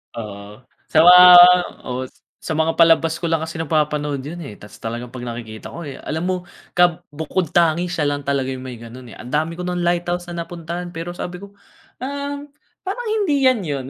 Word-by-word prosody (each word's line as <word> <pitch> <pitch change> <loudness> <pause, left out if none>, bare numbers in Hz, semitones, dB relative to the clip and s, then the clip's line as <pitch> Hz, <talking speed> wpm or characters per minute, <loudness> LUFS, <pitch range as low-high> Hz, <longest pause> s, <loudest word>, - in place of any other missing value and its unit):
Oo, 105 -3 -6 0.5
sa - - +1
mga 180 +2 +9 0.7
oo, 125 +1 -3 0.4
sa - - -1
mga 165 +1 +1
palabas 165 -1 +5
ko - - -4
lang 165 -1 0
kasi 160 +1 -6
nagpapanood 150 -3 -1
'yon, 150 +6 -7
eh. 120 - -8
Tapos 105 - -13
talagang 120 +2 -5
'pag 125 0 -8
nakikita 115 -2 -8
ko, - - -8
eh, 140 -5 -7
alam 160 +1 -3
mo 185 - +1 0.4
kab 175 -2 +3
bukod-tangi, 165 +2 0
siya 165 -4 -1
lang 145 0 -3
talaga 140 -2 -1
yung 130 - -7
may 125 -2 -7
gano'n 115 +2 -11
eh. - - -12
Andami 155 +6 -3
ko 180 - -5
nang 180 0 -2
lighthouse 175 0 -1
na 170 -1 -4
napuntahan 175 +1 -6
pero 165 +1 -5
sabi 180 +1 -6
ko, 200 - -9 0.5
"Um, 285 +1 -4 0.4
parang 450 +5 -4
hindi 360 -11 +1
'yan 255 - +1
'yon." 140 -3 -3
160 Hz, 190 wpm, -20 LUFS, 135-175 Hz, 0.7 s, mga